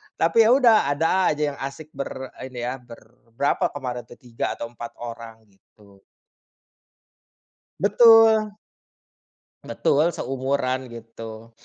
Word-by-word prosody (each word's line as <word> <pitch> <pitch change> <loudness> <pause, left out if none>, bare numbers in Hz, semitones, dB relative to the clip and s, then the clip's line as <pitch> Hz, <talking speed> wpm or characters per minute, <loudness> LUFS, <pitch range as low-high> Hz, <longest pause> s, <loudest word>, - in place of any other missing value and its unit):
tapi, 220 +7 +3
ya - - +4
udah, 230 - +4
ada 165 +6 +1
aja 150 -1 -1
yang 140 - -11
asik 140 +3 -7
ber 130 -1 -7 0.2
ini 125 -2 -7
ya 125 +2 -4
ber 120 -1 -14 0.4
berapa 140 - +1
kemarin 125 -3 -5
tuh - - -13
3 120 -2 -4
atau 115 - -6
4 120 0 -9
orang, 115 -1 -9
gitu. 100 0 -24 1.8
Betul. 220 +1 +6 1.2
Betul, 150 +4 +1
seumuran 130 0 -2
gitu. 115 0 -10
130 Hz, 120 wpm, -23 LUFS, 115-165 Hz, 1.8 s, Betul